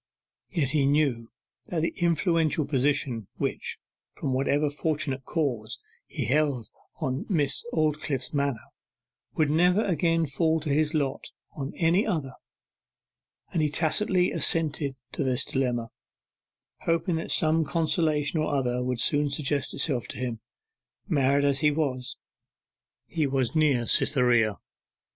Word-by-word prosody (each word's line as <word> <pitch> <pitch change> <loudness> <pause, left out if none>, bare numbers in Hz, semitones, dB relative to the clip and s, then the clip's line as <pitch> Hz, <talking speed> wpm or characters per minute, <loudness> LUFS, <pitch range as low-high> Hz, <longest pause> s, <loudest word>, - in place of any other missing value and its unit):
Yet 145 -8 0
he 145 -3 +2
knew 140 -6 +1 0.4
that 165 -3 -2
the - - 0
influential 165 -2 +1
position, 135 -5 0
which, - - -3 0.4
from 135 - -3
whatever 140 +3 +1
fortunate 145 -3 -2
cause, 130 -10 -2 0.3
he 140 -7 -4
held 140 -1 0 0.2
on 130 +1 -3
Miss 145 -7 +1
Aldclyffe's 150 -4 -1
manor, 140 -5 -1 0.7
would 155 -2 +2
never 180 +6 +3
again 165 -2 +1
fall 160 +3 +1
to 155 - -4
his 155 +2 +1
lot 140 -2 -1 0.2
on 135 -1 -5
any 175 +6 +2
other, 155 -10 -2 1.2
and 165 - +1
he 150 - +2
tacitly 180 +4 +1
assented 150 -4 +2 0.2
to - - -2
this 130 0 +2
dilemma, 125 -3 -1 1.0
hoping 165 0 +1
that 160 - -5
some 160 +1 +3
consolation 155 -1 +1
or 155 -1 0
other 125 -2 0
would 125 -1 -2
soon 145 +3 +3
suggest 140 0 0
itself 130 -6 -1
to - - -7
him; 120 -3 -3 0.7
married 140 -3 +2
as 140 -1 +2
he 150 0 +4
was, 140 -4 -2 0.9
he 155 -3 -1
was 130 -2 -1
near 145 -6 +3
Cytherea. 120 - +3
145 Hz, 130 wpm, -27 LUFS, 130-160 Hz, 1.2 s, he